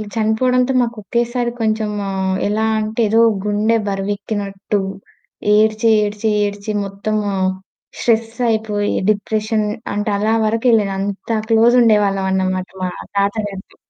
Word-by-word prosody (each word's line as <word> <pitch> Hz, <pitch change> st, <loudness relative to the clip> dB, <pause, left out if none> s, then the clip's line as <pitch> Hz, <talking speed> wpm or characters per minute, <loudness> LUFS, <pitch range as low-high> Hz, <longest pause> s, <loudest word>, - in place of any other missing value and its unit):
చనిపోవడంతో 250 Hz, +4 st, +2 dB
మాకు 235 Hz, -1 st, -2 dB
ఒకేసారి 240 Hz, +2 st, -1 dB
కొంచెం 215 Hz, -1 st, 0 dB, 0.2 s
ఆహ్, 190 Hz, -1 st, -1 dB
ఎలా 215 Hz, +2 st, 0 dB
అంటే 215 Hz, +2 st, -2 dB
ఏదో 225 Hz, -, +3 dB, 0.3 s
గుండె 210 Hz, +2 st, +1 dB
బరివెక్కినట్టు. 200 Hz, 0 st, -2 dB, 0.8 s
ఏడ్చి, 220 Hz, +1 st, +3 dB
ఏడ్చి, 210 Hz, +1 st, -1 dB, 0.2 s
ఏడ్చి, 205 Hz, +1 st, -4 dB
మొత్తము 205 Hz, +2 st, -2 dB, 0.7 s
స్ట్రెస్సయిపోయి 225 Hz, -2 st, 0 dB, 0.2 s
డిప్రెషన్ 215 Hz, +1 st, 0 dB, 0.3 s
అంటే 205 Hz, +1 st, -1 dB
అలా 215 Hz, +2 st, +1 dB
వరకెళ్ళాను. 225 Hz, -2 st, +2 dB
అంత 200 Hz, +3 st, -2 dB
క్లోజ్ 230 Hz, +2 st, +5 dB
ఉండేవాళ్ళమన్నమాట 190 Hz, -4 st, +1 dB, 0.2 s
మా 180 Hz, -, 0 dB, 0.3 s
తాతగారితొ. 200 Hz, -1 st, -2 dB
215 Hz, 105 wpm, -18 LUFS, 200-225 Hz, 0.8 s, క్లోజ్